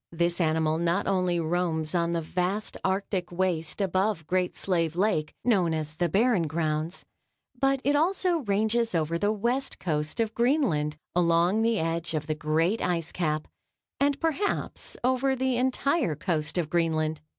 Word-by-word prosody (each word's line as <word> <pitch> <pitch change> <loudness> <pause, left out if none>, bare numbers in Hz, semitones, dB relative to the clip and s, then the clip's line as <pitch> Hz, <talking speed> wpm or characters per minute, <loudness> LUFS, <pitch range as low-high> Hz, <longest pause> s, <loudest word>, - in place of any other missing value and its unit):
This 170 +1 0
animal 160 -1 +1
not 170 +4 +1
only 180 -3 +1
roams 160 -2 0
on 170 -1 +1
the 165 -1 -1
vast 185 +6 -2
Arctic 190 -1 -1
waste 175 -3 -1
above 190 -2 0
Great 180 +2 0
Slave 170 -4 -1
Lake, 180 -5 0
known 185 -8 +2
as 155 -1 -4
the 170 +2 0
Barren 205 -2 +2
Grounds, 155 +1 -2 0.5
but 270 0 +2
it 285 +1 +2
also 350 +2 +2
ranges 220 - +1
over 165 +1 0
the 205 +4 +2
west 240 +6 -1
coast 150 +2 -2
of 225 -1 0
Greenland, 230 - +1 0.2
along 175 +4 +3
the 230 0 +2
edge 165 0 -2
of 150 -1 -2
the 155 - -1
great 160 +7 0
ice 170 -2 -1
cap 155 -3 -1 0.5
and 280 0 +2
perhaps 330 +5 -2
over 260 +1 +2
the 260 -1 0
entire 260 - +1
coast 155 0 -1
of 170 -3 0
Greenland. 160 -2 0
175 Hz, 155 wpm, -27 LUFS, 160-225 Hz, 0.5 s, along